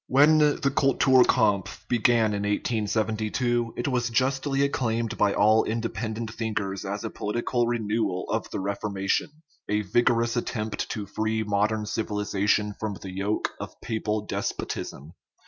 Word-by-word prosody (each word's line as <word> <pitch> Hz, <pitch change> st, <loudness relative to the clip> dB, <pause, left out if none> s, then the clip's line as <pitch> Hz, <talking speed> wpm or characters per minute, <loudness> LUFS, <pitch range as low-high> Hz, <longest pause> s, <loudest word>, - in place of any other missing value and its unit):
When 150 Hz, +4 st, +5 dB
the 145 Hz, -2 st, +2 dB
cultur 135 Hz, -2 st, +5 dB
kampf 105 Hz, -6 st, +1 dB
began 115 Hz, -2 st, +3 dB
in 100 Hz, -, -2 dB
1872, 110 Hz, +3 st, 0 dB
it 120 Hz, -, -2 dB
was 125 Hz, -3 st, 0 dB
justly 135 Hz, +3 st, +1 dB
acclaimed 115 Hz, -5 st, 0 dB
by 100 Hz, -2 st, +2 dB
all 110 Hz, +2 st, +5 dB
independent 115 Hz, 0 st, -3 dB
thinkers 105 Hz, -4 st, -3 dB
as 100 Hz, +2 st, -4 dB
a -, -, -4 dB
political 120 Hz, +3 st, -1 dB
renewal 110 Hz, -5 st, -1 dB
of -, -, -2 dB
the -, -, -4 dB
Reformation, 100 Hz, +2 st, -1 dB, 0.4 s
a 105 Hz, +1 st, +2 dB
vigorous 115 Hz, +3 st, +2 dB
attempt 110 Hz, -2 st, -3 dB
to 105 Hz, -, -4 dB
free 110 Hz, +2 st, -1 dB
modern 105 Hz, +1 st, 0 dB
civilization 105 Hz, -1 st, 0 dB
from 105 Hz, -2 st, -3 dB
the 95 Hz, 0 st, -8 dB
yoke 100 Hz, +3 st, -1 dB
of -, -, -8 dB
papal 110 Hz, -2 st, -2 dB
despotism. 75 Hz, -5 st, -4 dB
110 Hz, 135 wpm, -26 LUFS, 105-120 Hz, 0.4 s, When